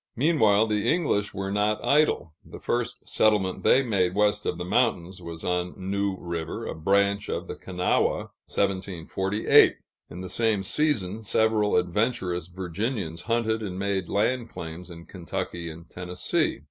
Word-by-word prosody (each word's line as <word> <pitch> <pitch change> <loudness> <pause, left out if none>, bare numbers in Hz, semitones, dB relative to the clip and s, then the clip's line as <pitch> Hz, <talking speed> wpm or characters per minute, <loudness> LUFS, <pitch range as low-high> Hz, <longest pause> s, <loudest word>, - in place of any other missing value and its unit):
Meanwhile, 110 -7 +4
the 105 -2 +1
English 140 - +1
were 95 0 -4
not 105 +1 +1
idle. 145 - +2
The - - -11
first 120 +1 -2
settlement 105 -4 +2
they 135 - +5
made 95 -6 +1
west 105 0 +2
of - - -1
the 90 - -4
mountains, 95 -4 0
was 85 -1 -8
on 90 0 -1
New 100 +1 -1
River, 85 -2 -4
a - - -4
branch 100 +4 +1
of - - -2
the - - -4
Kanawha 90 -1 0 0.2
(1748); 95 +1 +2 0.3
in 90 - -8
the 95 - -5
same 110 -1 +1
season, 110 -5 0
several 110 0 +2
adventurous 90 -2 0
Virginians 90 0 -3
hunted 110 -1 +1
and 95 -4 -4
made 95 -2 -1
land 115 +3 0
claims 85 +2 -8
in 85 -1 -10
Kentucky 85 -2 -5
and 80 +1 -11
Tennessee. 90 +1 -1
100 Hz, 145 wpm, -26 LUFS, 90-110 Hz, 0.3 s, they